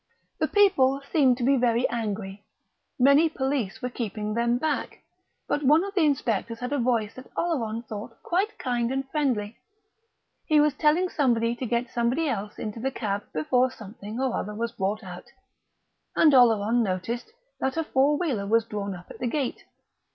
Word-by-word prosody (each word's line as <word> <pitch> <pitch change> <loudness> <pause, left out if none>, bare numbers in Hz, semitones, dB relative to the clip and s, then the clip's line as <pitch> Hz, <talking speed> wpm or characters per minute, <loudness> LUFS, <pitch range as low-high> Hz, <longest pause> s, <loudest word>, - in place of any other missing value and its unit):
The - - +2
people 275 -10 +4
seemed 265 -6 +4
to 250 - -3
be 275 +2 +4
very 240 0 +2
angry; 210 -3 -4 0.5
many 280 +5 +5
police 265 -9 -2
were 250 - -1
keeping 215 -3 -4
them 235 +1 +1
back; 300 +3 -3 0.4
but 290 - 0
one 300 +5 +5
of 400 0 -5
the 385 - +2
inspectors 235 -7 0
had 250 +3 -3
a 285 - 0
voice 230 -3 0
that 255 - -12
Oleron 235 -10 -1
thought 220 +1 -8
quite 390 +5 0
kind 240 -2 -1
and 270 0 -2
friendly. 240 -8 -1 0.9
He 305 -1 +4
was 295 -1 +4
telling 315 +6 +2
somebody 235 -6 +1
to 250 +1 -4
get 235 +1 -1
somebody 245 +7 0
else 210 -6 -3
into 215 +1 -5
the 265 +4 -1
cab 205 -5 -3
before 245 +12 +2
something 215 -1 -9
or 260 -2 0
other 210 +1 -4
was 230 +1 -2
brought 210 0 -2
out; 180 -2 -9 0.9
and 305 -3 +5
Oleron 235 -2 +5
noticed 225 - -3 0.3
that 265 +3 -1
a 325 - +1
four 290 0 +2
wheeler 265 - -1
was 225 +1 +3
drawn 200 -3 -4
up 180 0 -11
at - - -11
the 245 - -1
gate. 270 0 -2
240 Hz, 175 wpm, -26 LUFS, 215-275 Hz, 0.9 s, many